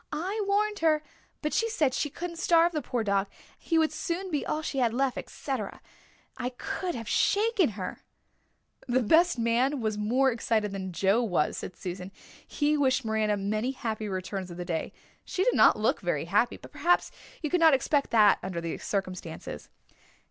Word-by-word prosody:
"I 380 +8 -2
warned 415 +1 +1
her 310 -2 +2 0.4
but 300 - -1
she 455 - +1
said 300 - +1
she 295 - -1
couldn't 340 +3 -6
starve 340 0 +4
the 310 -3 -2
poor 245 -3 -2
dog 200 -1 +1 0.3
he 330 - 0
would 320 -1 +3
soon 365 +2 -3
be 295 - 0
all 310 - -2
she 275 - -2
had 235 -2 +1
left, 265 0 +1
etc. 255 -8 -5 0.6
I 250 0 -1
could 390 -3 -3
have 230 -2 -6
shaken 410 - +2
her." 185 - -5 0.9
"The 250 0 +2
best 330 +7 +4
man 240 +5 +1
was 215 -2 -2
more 255 +6 +2
excited 225 -3 0
than 190 -1 -5
Joe 195 +6 +2
was," 180 -10 0
said - - -6
Susan. 180 +1 -6 0.4
"He 295 0 +1
wished 265 -3 +2
Miranda 215 -1 +1
many 215 +6 -1
happy 220 -4 -4
returns 185 0 -4
of 175 - -9
the 175 - -5
day. 165 -2 -3 0.3
She 370 - -1
did - - +3
not - - +6
look - - +1
very - - -1
happy, - - +1
but - - -14
perhaps 355 +1 +2 0.3
you 305 - -2
could 360 - +3
not 320 -4 +7
expect 280 +1 +1
that 215 -3 +5
under 185 -2 -4
the 170 -1 -4
circumstances." 185 -4 -5
250 Hz, 185 wpm, -28 LUFS, 205-320 Hz, 0.9 s, not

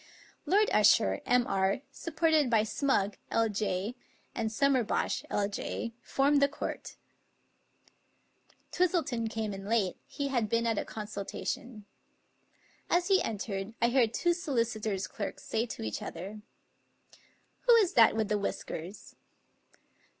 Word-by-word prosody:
Lord 420 +3 +3
Usher, 100 - +4
M.R., 200 -3 +2
supported 315 -4 +1
by 225 -2 +4
Smugg, 215 -4 0
LJ,, 210 -2 0 0.4
and 220 -2 -2
Sum 275 +5 +3
merbosh, 240 -4 0
L.J., 205 +3 -2
formed 280 +3 +2
the 280 - +6
court. 285 - -6 1.8
Twistleton 315 -11 0
came 220 -2 -3
in 195 0 -7
late; 210 -4 +1
he 280 -1 -3
had 240 -5 0
been 230 +1 +1
at 225 -2 +1
a - - -3
consultation. 215 +1 -5 1.0
As 350 +2 +2
he 385 -1 +5
entered 205 -1 -4
I 235 - +3
heard 240 -3 +3
two 345 +8 +1
solicitors' 230 - -1
clerks 205 - -6
say 225 +2 -1
to 220 - -6
each 110 -1 -3
other: 195 +5 -7 0.6
" - - -29
Who 480 - +8
is 420 -6 +4
that 230 -2 +6
with 220 -1 0
the 210 0 0
whiskers? 190 -1 -5
225 Hz, 130 wpm, -30 LUFS, 205-275 Hz, 1.8 s, Who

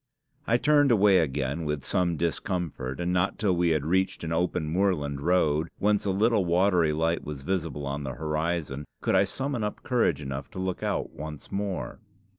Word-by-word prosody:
I 115 - +4
turned 145 +1 +4
away 100 -3 +5
again 70 +1 -1
with 75 -3 -2
some 85 -2 0
discomfort, 85 -5 -2
and 90 +1 -1
not 90 +2 +1
till 100 -4 +1
we 85 0 +2
had 75 -3 +1
reached 95 +3 0
an 80 - -3
open 85 -1 0
moorland 75 -5 0
road, 80 -2 +2
whence 105 0 +1
a - - +1
little 105 +2 +3
watery 90 -2 +3
light 80 +2 0
was 70 -2 -6
visible 80 -4 -2
on 70 +1 -3
the 65 -2 -5
horizon, 75 -2 -2 0.2
could - - 0
I - - +5
summon 135 -4 -3
up 105 - -4
courage 115 - +1
enough 70 -1 -5
to - - -9
look 95 -1 -2
out - - -2
once 75 0 -8
more. 100 -1 -3
85 Hz, 185 wpm, -27 LUFS, 75-95 Hz, 0.2 s, away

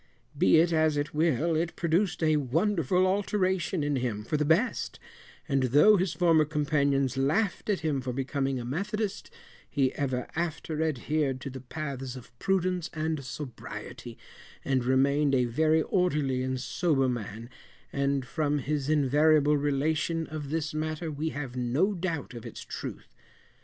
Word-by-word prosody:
Be 95 - +5
it 170 +1 +4
as 155 -2 +3
it 145 +1 -2
will, 160 +1 +1
it 165 +1 -1
produced 175 +1 0
a 155 -1 +4
wonderful 165 - +1
alteration 190 -3 0
in 145 -1 0
him 120 -5 -2
for 135 - -2
the 150 - +2
best; 165 - +1 0.5
and 135 -3 +1
though 145 - +6
his 180 -4 0
former 165 -2 +4
companions 140 -3 +1
laughed 180 +12 0
at 200 -3 +1
him 150 -4 0
for 125 0 -3
becoming 135 +1 -1
a 120 - -5
methodist, 200 - -3 0.4
he 135 -3 +1
ever 130 -3 -2
after 160 -1 -2
adhered 150 -2 0
to 135 - -5
the 130 0 -8
paths 135 -1 -5
of 125 -1 -12
prudence 185 -3 0
and 155 -2 -2
sobriety, 125 0 -8 0.5
and 130 -3 +1
remained 140 +2 +3
a 125 -1 +3
very 155 +6 +2
orderly 150 -9 +1
and 130 0 -2
sober 135 0 +1
man, 115 -2 -4 0.5
and 140 -1 0
from 150 +1 0
his 145 0 -2
invariable 150 +1 +4
relation 150 +3 0
of 150 -3 -6
this 155 0 -2
matter 155 +1 -3
we 150 +2 -2
have 135 -5 -6
no 130 +11 +1
doubt 170 -7 -3
of 120 -2 -8
its - - -8
truth. - - -7
150 Hz, 155 wpm, -28 LUFS, 135-165 Hz, 0.5 s, though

